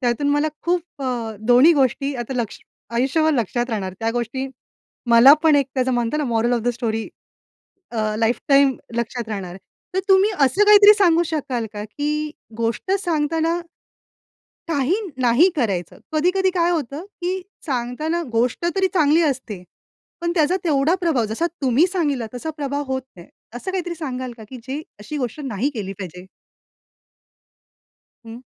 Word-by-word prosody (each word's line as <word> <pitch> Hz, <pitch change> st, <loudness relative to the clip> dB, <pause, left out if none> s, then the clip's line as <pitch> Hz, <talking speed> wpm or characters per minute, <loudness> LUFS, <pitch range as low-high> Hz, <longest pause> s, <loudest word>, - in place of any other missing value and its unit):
त्यातून 250 Hz, +3 st, 0 dB
मला 290 Hz, +2 st, +2 dB
खूप 345 Hz, -4 st, -2 dB
अ, 235 Hz, -4 st, -3 dB
दोन्ही 245 Hz, +8 st, +6 dB
गोष्टी 275 Hz, 0 st, +1 dB
आता 245 Hz, +1 st, -5 dB
लक्ष 230 Hz, -3 st, -3 dB, 0.3 s
आयुष्यभर 275 Hz, +7 st, +2 dB
लक्षात 240 Hz, +1 st, -1 dB
राहणार. 195 Hz, -4 st, -3 dB
त्या 225 Hz, 0 st, 0 dB
गोष्टी 240 Hz, +3 st, -3 dB, 0.6 s
मला 245 Hz, +5 st, +9 dB
पण 315 Hz, -2 st, +5 dB
एक 280 Hz, -2 st, +2 dB
त्याचं 260 Hz, 0 st, +1 dB
म्हणतात 240 Hz, +3 st, 0 dB
ना 300 Hz, -, 0 dB
moral 235 Hz, 0 st, +1 dB
of 240 Hz, -, +1 dB
the 245 Hz, -, 0 dB
story 225 Hz, -2 st, -2 dB, 0.8 s
a, 215 Hz, -2 st, -1 dB
life 230 Hz, +2 st, +1 dB
time 275 Hz, -2 st, +5 dB, 0.2 s
लक्षात 235 Hz, 0 st, -3 dB
राहणार 195 Hz, -4 st, -4 dB
आहे. 180 Hz, -, -9 dB, 0.4 s
तर 380 Hz, -, +2 dB
तुम्ही 385 Hz, +2 st, +5 dB
असं 275 Hz, +11 st, +3 dB
काहीतरी 415 Hz, 0 st, +8 dB
सांगू 345 Hz, -3 st, +4 dB
शकाल 270 Hz, -7 st, -2 dB
का, 210 Hz, 0 st, -5 dB
की 300 Hz, +6 st, -3 dB, 0.3 s
गोष्ट 230 Hz, -, -2 dB
सांगताना, 330 Hz, -1 st, 0 dB, 1.1 s
काही 290 Hz, 0 st, +1 dB, 0.3 s
नाही 250 Hz, +10 st, +5 dB
करायचं? 195 Hz, -, -2 dB
कधी-कधी 365 Hz, +5 st, +2 dB
काय 345 Hz, -1 st, +2 dB
होतं, 300 Hz, -1 st, -3 dB, 0.2 s
की 365 Hz, +2 st, -2 dB, 0.3 s
सांगताना 280 Hz, +6 st, -2 dB
गोष्ट 240 Hz, +7 st, 0 dB
तरी 385 Hz, 0 st, +3 dB
चांगली 315 Hz, -1 st, +4 dB
असते, 255 Hz, -, -2 dB, 0.6 s
पण 340 Hz, 0 st, -1 dB
त्याचा 325 Hz, +2 st, +2 dB
तेवढा 305 Hz, 0 st, +2 dB
प्रभाव, 315 Hz, -10 st, +1 dB
जसा 220 Hz, +11 st, -1 dB, 0.2 s
तुम्ही 265 Hz, +7 st, +4 dB
सांगितला, 295 Hz, -10 st, -1 dB
तसा 315 Hz, +6 st, -4 dB
प्रभाव 285 Hz, -1 st, -2 dB
होत 265 Hz, 0 st, -2 dB
नाही. 175 Hz, 0 st, -13 dB, 0.3 s
असं 245 Hz, +10 st, -5 dB
काहीतरी 360 Hz, -2 st, -3 dB
सांगाल 260 Hz, -6 st, -5 dB
का, 220 Hz, -, -11 dB
की 260 Hz, -, -7 dB
जे 285 Hz, +4 st, -3 dB, 0.2 s
अशी 210 Hz, +9 st, -6 dB
गोष्ट 255 Hz, +1 st, -3 dB
नाही 250 Hz, +3 st, -1 dB
केली 195 Hz, -3 st, -4 dB
पाहिजे. 180 Hz, -1 st, -8 dB, 2.0 s
हं. 230 Hz, +3 st, -10 dB
270 Hz, 155 wpm, -21 LUFS, 235-320 Hz, 2.0 s, मला